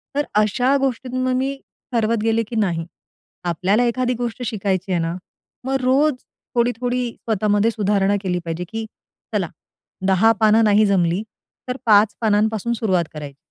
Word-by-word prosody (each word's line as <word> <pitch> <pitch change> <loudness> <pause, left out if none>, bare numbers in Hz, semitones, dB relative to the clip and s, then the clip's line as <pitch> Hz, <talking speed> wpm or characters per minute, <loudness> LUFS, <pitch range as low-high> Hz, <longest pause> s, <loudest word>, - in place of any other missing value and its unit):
तर 290 +1 +1 0.2
अशा 245 +6 +2
गोष्टी 260 -1 -1
मग 255 0 +1
मी 265 +2 -1 0.4
ठरवत 230 -1 +1
गेले, 225 0 +2
की 230 - -7
नाही. 175 -7 0 0.6
आपल्याला 185 +6 +1
एखादी 250 +1 0
गोष्ट 245 0 -3
शिकायची 195 -4 -2
आहे 175 - +2
ना? 165 +1 -2 0.5
मग 265 +1 0
रोज 275 +4 +3 0.4
थोडी-थोडी 245 +1 0
स्वतःमध्ये 210 0 +1
सुधारणा 205 -2 +1
केली 180 -2 -1
पाहिजे, 165 +1 -3
की 225 0 -4 0.5
चला, - - 0 0.6
10 195 +4 +5
पानं 220 +1 +5
नाही 210 0 +5
जमली 185 -1 +1 0.5
तर 250 - -2
5 210 -1 +5
पानांपासून 220 +1 +1
सुरुवात 190 -7 +1
करायची. 145 -3 -8
220 Hz, 145 wpm, -21 LUFS, 195-245 Hz, 0.6 s, 10